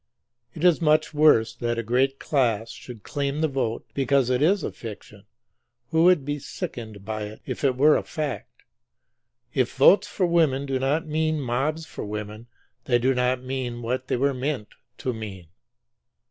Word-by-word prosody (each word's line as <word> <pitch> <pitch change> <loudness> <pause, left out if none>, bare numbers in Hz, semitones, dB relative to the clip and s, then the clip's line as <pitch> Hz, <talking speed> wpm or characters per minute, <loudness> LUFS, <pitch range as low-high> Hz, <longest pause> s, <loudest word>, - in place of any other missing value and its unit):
It 155 - -6
is 175 -2 +4
much 155 0 +3
worse 145 -7 +4
that 120 0 -2
a 115 - -1
great 130 +4 +1
class 115 -7 0
should 120 -2 -11
claim 140 0 -2
the 160 - +3
vote 130 -5 -2
be 140 - 0
cause 135 -1 +3
it 125 +1 +1
is 190 +6 +3
a - - -2
fiction, 105 -2 -10 0.7
who 160 +1 +4
would 180 -6 +5
be 145 0 -2
sickened 110 -7 -7
by 110 0 -3
it 105 +1 -10
if - - -5
it 135 -2 +3
were 150 +3 +6
a - - +1
fact. 150 -5 -5 0.9
If 130 -3 0
votes 190 +9 +6
for 205 -2 0
women 160 -6 +2
do 135 -1 -1
not 145 +6 0
mean 155 0 0
mobs 140 +5 -1
for - - -7
women 105 +2 -6 0.4
they 120 - +3
do 130 +2 +2
not 125 0 0
mean 125 -2 -4
what 130 +2 -2
they - - 0
were 140 +2 +2
meant 130 -4 -3 0.3
to 130 - -2
mean. 100 -7 -8
130 Hz, 180 wpm, -25 LUFS, 120-150 Hz, 0.9 s, were